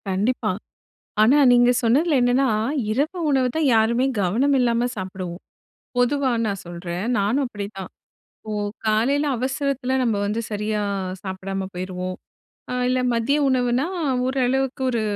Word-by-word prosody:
கண்டிப்பா. 215 +3 0 0.7
ஆனா, 240 +7 +6
நீங்க 245 0 +5
சொன்னதில 285 +7 +3
என்னான்னா, 250 +2 +3 0.4
இரவு 290 +10 -1
உணவு 265 -3 +3
தான் 320 -2 +2
யாருமே 235 +3 +3 0.2
கவனம் 240 +10 +2
இல்லாம 240 -1 +2
சாப்பிடுவோம். 185 -2 -6 0.6
பொதுவா 260 +2 +2 0.2
நான் 200 -2 -3
சொல்றேன். 175 +1 -5
நானும் 220 +8 +1
அப்படிதான் 200 -4 -7 0.6
இப்போ 215 - -5 0.3
காலையில 240 +7 +2
அவசரத்தில 265 0 -1
நம்ப 230 -4 +1
வந்து 210 +3 -1
சரியா 210 +1 -1 0.4
சாப்பிடாம 190 0 -4
போயிருவோம். 185 0 -4 0.6
அ - - -2 0.2
இல்ல, 255 0 +1
மதிய 235 +5 +1
உணவுன்னா, 250 +1 +1 0.4
ஓரளவுக்கு 265 0 0
ஒரு 235 -3 -1
235 Hz, 125 wpm, -23 LUFS, 200-265 Hz, 0.7 s, ஆனா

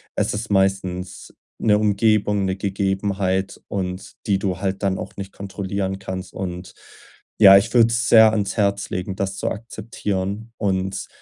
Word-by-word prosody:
es - - 0
ist 110 +2 -4
meistens 95 -2 -1 0.3
'ne 105 -2 +4
Umgebung, 105 -1 +2
'ne 95 0 -1
Gegebenheit 95 -1 -1
und 90 -1 -4
die 100 -2 +2
du 95 -2 -2
halt 95 0 -2
dann 95 -1 +1
auch - - -7
nicht 100 -1 -6
kontrollieren 95 -1 -4
kannst. 95 -1 -6
Und 90 -1 -6 0.7
ja, 100 -3 +10
ich 100 - +1
würde 115 -2 +6
es 120 +1 0
sehr 110 -1 +8
ans 100 -3 -2
Herz 100 -1 0
legen, 95 +1 -4
das 95 0 -3
zu - - -1
akzeptieren 105 -1 -4
und 95 -2 -2
100 Hz, 155 wpm, -22 LUFS, 95-105 Hz, 0.7 s, ja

